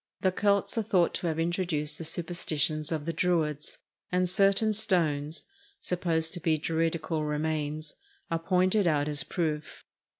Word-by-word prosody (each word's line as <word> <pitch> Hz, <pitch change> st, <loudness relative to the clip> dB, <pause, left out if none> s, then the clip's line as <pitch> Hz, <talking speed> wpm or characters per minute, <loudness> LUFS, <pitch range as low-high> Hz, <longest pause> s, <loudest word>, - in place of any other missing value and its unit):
The 185 Hz, -, +3 dB
Celts 200 Hz, +3 st, +1 dB
are -, -, +2 dB
thought 190 Hz, -5 st, +2 dB
to 175 Hz, -, -2 dB
have 160 Hz, -1 st, -1 dB
introduced 165 Hz, -3 st, -1 dB
the -, -, -4 dB
superstitions 160 Hz, -2 st, 0 dB
of 155 Hz, -2 st, -2 dB
the 165 Hz, -, -2 dB
Druids, 155 Hz, -4 st, 0 dB, 0.3 s
and 180 Hz, 0 st, +2 dB
certain 200 Hz, +3 st, +3 dB
stones, 160 Hz, -7 st, +1 dB, 0.3 s
supposed 165 Hz, -2 st, 0 dB
to 175 Hz, -, -2 dB
be 160 Hz, -1 st, +1 dB
Druidical 160 Hz, 0 st, -1 dB
remains, 150 Hz, 0 st, -2 dB, 0.4 s
are 165 Hz, -, +1 dB
pointed 185 Hz, +3 st, +2 dB
out 150 Hz, -2 st, +2 dB
as 150 Hz, -1 st, 0 dB
proof. 155 Hz, -3 st, -3 dB
165 Hz, 145 wpm, -29 LUFS, 155-180 Hz, 0.4 s, The